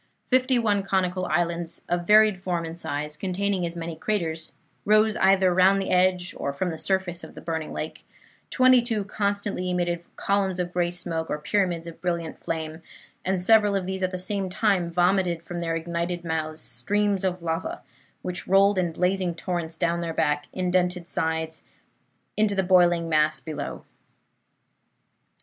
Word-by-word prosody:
Fifty 255 0 +3
one 210 -4 +2
conical 185 -1 0
islands, 170 0 -1
of 175 0 -1
varied 215 -3 +5
form 175 -3 -2
and 165 +1 -7
size, 150 -1 -3
containing 190 +1 -1
as 170 - -7
many 165 -1 -5
craters, 165 -4 -2 0.3
rose 215 +1 +4
either 190 -1 +4
round 190 +2 +5
the 195 - -2
edge 180 0 +2
or 140 - -1
from 175 +6 -2
the 160 - -6
surface 190 -3 0
of - - -11
the - - -8
burning 160 -2 -4
lake; 155 - -6 0.5
twenty 255 -1 +5
two 225 -4 -1
constantly 200 -2 -2
emitted 175 -1 -1
columns 195 -2 0
of 175 0 -2
gray 175 -1 +1
smoke 170 -2 -4
or 150 - -1
pyramids 175 0 0
of 170 -1 -10
brilliant 170 -2 -2
flame, 160 0 -4 0.4
and 190 0 0
several 210 0 +5
of 190 -2 -1
these 190 0 -4
at 185 - +1
the 185 - -4
same 190 +1 -2
time 185 -3 +1
vomited 175 -1 +1
from 175 0 -5
their 165 -1 -1
ignited 170 +1 -3
mouths 160 -1 -3
streams 200 - 0
of 180 -2 -1
lava, 170 - -3 0.4
which 180 -1 -4
rolled 195 +1 +4
in 175 -2 0
blazing 180 0 0
torrents 170 -2 -3
down 170 0 0
their 165 -1 -4
black 145 0 0
indented 180 -1 0
sides 160 -1 -2 0.7
into 210 -1 +2
the 190 - +1
boiling 175 -2 +4
mass 155 -1 +2
below. 150 -3 -6
180 Hz, 165 wpm, -25 LUFS, 165-195 Hz, 0.7 s, varied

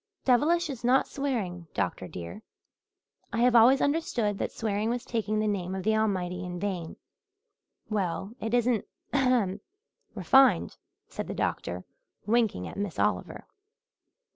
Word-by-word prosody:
"'Devilish' 315 +7 +3
is 265 -6 -7
not 255 +2 +3
swearing, 205 -12 -3
doctor, 90 -1 -2
dear. 85 -1 -8 0.9
I 230 - -1
have 245 0 +4
always 245 +4 +7
understood 245 -9 0
that - - -2
swearing 215 0 -1
was 245 +1 -2
taking 215 -2 -1
the 215 0 +1
name 190 -3 -2
of 190 - -4
the 220 +2 +2
Almighty 185 -4 -1
in 180 -1 -5
vain?" 180 -4 -3 0.9
"Well, 195 -1 -2
it 225 +2 -1
isn't 240 -3 +2 0.3
ahem 245 -8 +2 0.5
refined," 270 0 +4 0.3
said - - -6
the - - -5
doctor, - - -2 0.4
winking 220 - +1
at - - -9
Miss 200 -3 -3
Oliver. - - -1
215 Hz, 140 wpm, -28 LUFS, 185-245 Hz, 0.9 s, always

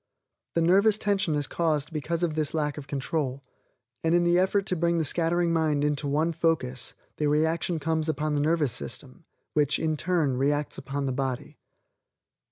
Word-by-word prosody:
The 165 - +3
nervous 200 +5 +4
tension 195 -7 0
is 145 -1 0
caused 155 0 -1
because 165 +3 -2
of 165 -3 +1
this 155 0 -1
lack 150 -2 0
of 140 - -10
control, 140 -1 -2 0.6
and 165 +1 +3
in 175 - +4
the 175 +1 +4
effort 190 +1 +2
to 185 - 0
bring 170 0 +1
the 160 - +1
scattering 170 +2 +1
mind 155 -3 +1
into 145 0 0
one 155 +4 +1
focus 155 -7 -1 0.2
the 150 - +1
reaction 160 +3 +1
comes 160 +1 -1
upon 155 0 -1
the 145 - +1
nervous 155 -3 +2
system 70 -9 -7 0.3
which, 150 -2 +2
in 155 -1 0
turn, 160 -6 0
reacts 145 +2 0
upon 140 +1 -3
the 135 - -1
body. 130 -1 -3
155 Hz, 175 wpm, -27 LUFS, 145-170 Hz, 0.6 s, nervous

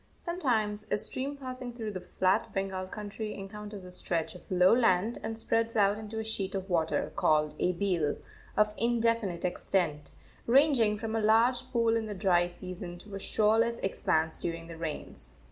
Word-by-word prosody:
Sometimes 225 - 0
a - - +2
stream 270 +6 0
passing 255 -2 -6
through 225 -3 -4
the 185 -2 -6
flat 185 +1 0
Bengal 190 -1 -2
country 210 +1 -6
encounters 205 0 -8
a 180 - -10
stretch 170 -2 -1
of 180 - -14
low 180 +1 +5
land 225 -2 +2
and 225 0 -4
spreads 225 0 +1
out 205 0 +3
into 220 0 -7
a 220 - -2
sheet 200 -3 -2
of 190 -1 -3
water, 160 -2 0
called 150 -1 +2
a 180 - +2
beel, 170 -5 0 0.4
of 210 0 +3
indefinite 230 -6 +1
extent, 175 -4 -1 0.4
ranging 245 -5 +4
from 225 +1 -4
a 225 - +1
large 240 +4 +3
pool 230 -1 +2
in 225 -1 -1
the 210 - -5
dry 180 -3 +3
season 175 0 -7
to 200 +3 -13
a 195 - -4
shoreless 225 +4 +2
expanse 160 -4 0
during 165 -1 -4
the 165 0 -9
rains. 155 - -6
210 Hz, 175 wpm, -30 LUFS, 180-225 Hz, 0.4 s, low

